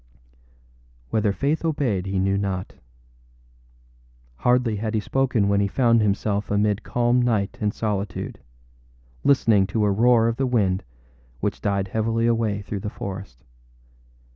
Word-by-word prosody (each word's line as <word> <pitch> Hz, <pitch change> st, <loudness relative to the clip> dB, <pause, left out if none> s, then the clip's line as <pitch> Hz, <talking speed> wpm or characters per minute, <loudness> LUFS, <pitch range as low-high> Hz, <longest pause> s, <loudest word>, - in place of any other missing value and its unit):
â -, -, -34 dB, 1.1 s
Whether 105 Hz, -2 st, +2 dB
Faith 145 Hz, +10 st, -1 dB
obeyed 130 Hz, -, -1 dB
he 95 Hz, 0 st, -2 dB
knew 95 Hz, +1 st, +1 dB
not. 95 Hz, -2 st, -3 dB, 1.6 s
Hardly 125 Hz, -, +2 dB
had 110 Hz, +1 st, -2 dB
he -, -, +2 dB
spoken 125 Hz, -2 st, +1 dB
when 100 Hz, 0 st, +2 dB
he 100 Hz, -, +2 dB
found 115 Hz, +1 st, +3 dB
himself 105 Hz, 0 st, 0 dB
amid 105 Hz, 0 st, +1 dB
calm 120 Hz, +2 st, +1 dB
night 110 Hz, -5 st, 0 dB
and 105 Hz, -1 st, +1 dB
solitude, 100 Hz, -4 st, -3 dB, 0.8 s
listening 115 Hz, -8 st, +4 dB
to 105 Hz, +2 st, 0 dB
a 100 Hz, -, +2 dB
roar 115 Hz, +2 st, +4 dB
of 115 Hz, 0 st, -1 dB
the 135 Hz, 0 st, 0 dB
wind 100 Hz, -7 st, +1 dB, 0.6 s
which -, -, -2 dB
died 100 Hz, -1 st, -1 dB
heavily 115 Hz, +2 st, 0 dB
away 110 Hz, -3 st, 0 dB
through 100 Hz, 0 st, -4 dB
the 105 Hz, +2 st, -4 dB
forest. 95 Hz, -11 st, -8 dB
105 Hz, 140 wpm, -23 LUFS, 100-115 Hz, 1.6 s, listening